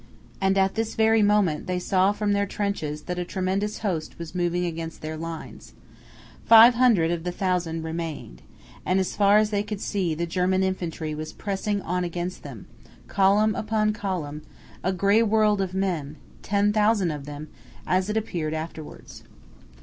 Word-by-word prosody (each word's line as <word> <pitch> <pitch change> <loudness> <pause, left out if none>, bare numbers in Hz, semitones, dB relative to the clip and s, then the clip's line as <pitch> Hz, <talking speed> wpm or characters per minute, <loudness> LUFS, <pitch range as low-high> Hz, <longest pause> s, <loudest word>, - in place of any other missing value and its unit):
And 195 0 +2
at 195 0 +2
this 225 -1 -2
very 220 0 +4
moment 205 -7 +2
they 180 0 -1
saw 185 +2 +2
from 205 0 -1
their 200 0 +1
trenches 160 -8 -3
that 180 0 -4
a - - -1
tremendous 190 +3 -2
host 170 -6 -3
was 170 -1 -8
moving 175 0 0
against 165 -1 -6
their 155 0 -4
lines. 165 0 -8 0.7
Five 230 +2 +8
hundred 230 -10 +3
of 170 -1 -2
the 180 - -2
thousand 175 -3 -1
remained, 160 - -6 0.4
and 185 +1 +1
as 190 - -2
far 205 0 +5
as 215 0 +2
they 205 -1 +1
could 210 -1 -5
see 185 -6 -1
the 170 +2 -2
German 185 +2 +1
infantry 175 -4 -3
was 155 +1 -6
pressing 200 0 -3
on 180 +1 -1
against 175 +1 -4
them, - - -10 0.4
column 205 +2 +3
upon 215 0 0
column, 175 -8 -4 0.4
a 185 - +1
gray 200 +4 +3
world 215 -2 +3
of 190 -1 -3
men, 170 -7 -2 0.3
ten 205 +1 +1
thousand 210 -4 +2
of 145 -2 -6
them, 145 +1 -8 0.4
as 185 +2 +1
it 210 - 0
appeared 165 -8 -2
afterwards. 155 -1 -8
185 Hz, 170 wpm, -25 LUFS, 165-205 Hz, 0.7 s, Five